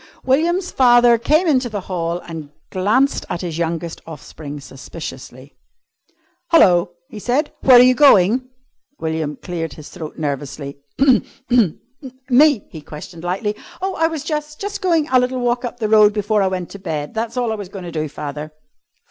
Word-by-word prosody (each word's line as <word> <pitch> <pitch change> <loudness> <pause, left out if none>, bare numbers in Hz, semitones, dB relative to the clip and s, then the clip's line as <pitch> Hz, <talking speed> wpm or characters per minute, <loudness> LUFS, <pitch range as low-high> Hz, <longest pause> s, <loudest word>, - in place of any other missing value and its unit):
William's 340 +7 +1
father 240 -2 +5
came 310 +9 +2
into 255 -5 +2
the 205 -3 -4
hall 170 -2 -3
and 160 -3 -7 0.2
glanced 220 +9 +1
at 175 - -3
his 170 -3 -4
youngest 165 0 -3
offspring 150 -1 -9
suspiciously. 135 -1 -10 1.0
"Hello!" 175 - +4
he 215 - -9
said, 260 +8 0
"where 255 -2 +7
are 245 - +9
you 255 0 +6
going?" 250 -2 +4 0.5
William 160 -2 -3
cleared 165 0 -5
his 155 - -11
throat 160 -5 -8
nervously. 140 -1 -4 1.5
"Me?" 280 -2 +5
he 160 - -9
questioned 155 +3 -10
lightly. 195 +4 -2 0.2
"Oh, 385 +1 -2
I 325 - +2
was 320 -3 -5
jus' 300 -1 -3
jus' 405 +4 -5
goin' 335 -5 +1
a 255 - +6
little 250 +1 -1
walk 245 0 0
up 245 0 -5
the 220 - 0
road 210 -1 +5
before 210 0 +1
I 195 - +2
went 185 -2 -4
to 200 - -9
bed. 155 -5 -4
That's 230 +2 -3
all 240 -2 0
I - - -1
was 205 -4 -7
goin' 195 -1 -8
to 170 - -6
do, 155 -2 -3
father." 150 +1 -6
205 Hz, 170 wpm, -19 LUFS, 160-255 Hz, 1.5 s, are